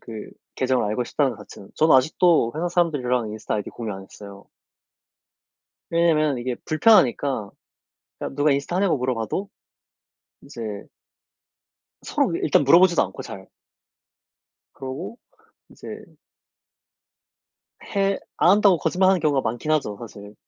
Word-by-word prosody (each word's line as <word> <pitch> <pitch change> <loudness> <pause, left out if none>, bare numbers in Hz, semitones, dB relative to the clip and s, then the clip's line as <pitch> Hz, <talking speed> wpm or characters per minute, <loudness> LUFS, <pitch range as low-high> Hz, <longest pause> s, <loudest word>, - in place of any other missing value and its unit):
그 110 -2 -9 0.3
계정을 130 -2 +1
알고 110 +4 -1
싶다는 135 +2 0
거 110 - -12
자체는. 100 - -13
저는 155 -1 +4
아직도 155 -1 +3
회사 170 +3 -2
사람들이랑 135 - 0
인스타그램 110 0 -3
아이디 105 - -6
공유 115 -3 -6
안 95 0 -8
했어요. 100 +1 -13 1.5
왜냐면 155 -5 +2
이게 120 0 -3
불편하니까. 145 - +3 0.7
그러니까 - - -6
누가 145 +1 +2
인스타 140 +5 -1
하냐고 190 -5 +2
물어봐도 125 - -3 0.9
이제 140 -4 -10 1.4
서로 - - 0
일단 - - +2
물어보지도 170 +4 +5
않고 95 - -6
잘. 95 -1 -10 1.3
그러고 135 - -7 0.5
이제 - - -10 1.9
해 195 0 +1 0.2
안 175 - +4
한다고 200 -2 +5
거짓말하는 185 +2 +2
경우가 145 -4 +2
많긴 120 +6 -3
하죠, 135 -10 0
사실. 105 -3 -11
140 Hz, 300 characters per minute, -23 LUFS, 115-170 Hz, 1.9 s, 물어보지도